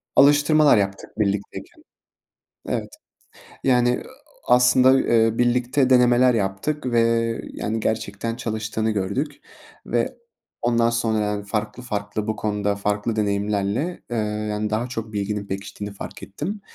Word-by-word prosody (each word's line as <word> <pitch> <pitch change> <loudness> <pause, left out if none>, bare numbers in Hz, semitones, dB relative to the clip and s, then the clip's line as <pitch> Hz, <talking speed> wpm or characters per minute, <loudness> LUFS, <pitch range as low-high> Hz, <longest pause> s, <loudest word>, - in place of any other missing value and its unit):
alıştırmalar 145 -1 +6
yaptık 100 +1 -3
birlikteyken. 100 -1 -3 0.9
Evet. - - -3 0.7
Yani, 125 -2 +4
ııı, 125 - 0
ooo, - - -7 0.5
aaa, 125 - +7
aslında, 125 +1 +5
ııı, 115 -4 +3
birlikte 125 +2 +2
denemeler 125 0 +5
yaptık 115 +8 -2
ve, 120 -2 +2 0.5
yani, 110 +1 -3
gerçekten 110 +1 -2
çalıştığını 110 -1 -2
gördük 110 +9 -2 0.5
ve - - -1 0.5
ondan 115 -1 +2
sonra, 115 -2 0
yani, 105 0 -2
farklı 105 +3 -3
farklı 105 -2 -3
bu 110 -1 -1
konuda 105 -1 -1
farklı 105 +2 -1
deneyimlerle, 105 - -1
ııı, 105 -2 -2
yani, 105 0 -2
daha 110 +3 0
çok 115 -3 -6
bilginin 100 0 -2
pekiştiğini 100 +1 -6
fark - - -9
ettim 155 - -5
110 Hz, 130 wpm, -23 LUFS, 105-125 Hz, 0.9 s, aaa